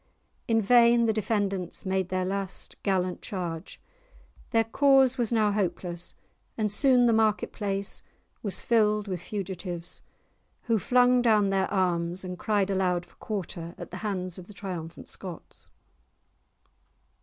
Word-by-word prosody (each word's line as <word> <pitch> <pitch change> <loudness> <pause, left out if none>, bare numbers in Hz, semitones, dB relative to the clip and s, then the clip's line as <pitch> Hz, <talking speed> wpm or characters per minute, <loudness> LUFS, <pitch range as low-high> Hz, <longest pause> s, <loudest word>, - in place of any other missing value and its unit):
In 225 -1 +2
vain 235 +1 +6
the 220 - +2
defenders 200 -3 -2
made 190 -1 0
their 185 0 0
last 195 0 -3
gallant 185 -2 0
charge; 170 -4 -5 0.7
their 225 -1 +3
cause 265 +2 +4
was 235 -2 +1
now 215 -3 +3
hopeless, 180 -3 -2 0.4
and 215 -2 0
soon 250 +2 +4
the 235 - +4
market 220 -1 +2
place 200 -2 -1 0.4
was 200 -4 -1
filled 215 -2 +2
with 185 -3 -3
fugitives, 180 -3 -5 0.6
who 230 -2 +1
flung 250 +3 +4
down 210 -4 +3
their 190 -1 +1
arms 180 -1 0
and 180 -1 -6
cried 205 -3 +1
aloud 180 -2 +1
for - - -25
quarter 175 -5 -5
at - - -9
the 185 - -6
hands 185 -4 -3
of 180 - -11
the 210 - -12
triumphant 175 -5 -6
Scots. 180 -4 -10
200 Hz, 140 wpm, -27 LUFS, 185-220 Hz, 0.7 s, vain